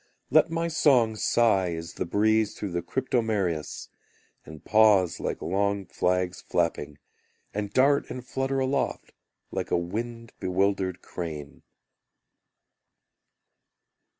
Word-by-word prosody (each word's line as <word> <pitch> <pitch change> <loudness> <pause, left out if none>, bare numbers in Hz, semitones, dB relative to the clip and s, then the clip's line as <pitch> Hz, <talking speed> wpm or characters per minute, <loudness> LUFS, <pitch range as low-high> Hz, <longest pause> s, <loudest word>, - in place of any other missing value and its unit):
Let 155 +3 +5
my 165 +1 -1
song 130 -8 +3
sigh 100 -6 +2
as 80 +1 -7
the - - -4
breeze 110 +3 +2
through 100 - -4
the 85 0 -1
cryptomerias, 105 - -1 0.6
And 80 0 -12
pause 105 -5 +4
like - - -3
long 100 +1 0
flags 90 0 -1
flapping, 75 0 -1 0.6
And 105 0 -3
dart 140 +4 +3
and 125 -1 -7
flutter 135 +1 -2
aloft, 135 +1 -1 0.4
like - - -3
a - - +2
wind 115 +6 -5
bewildered 95 0 0
crane. 75 -5 -7
100 Hz, 110 wpm, -27 LUFS, 90-120 Hz, 0.6 s, Let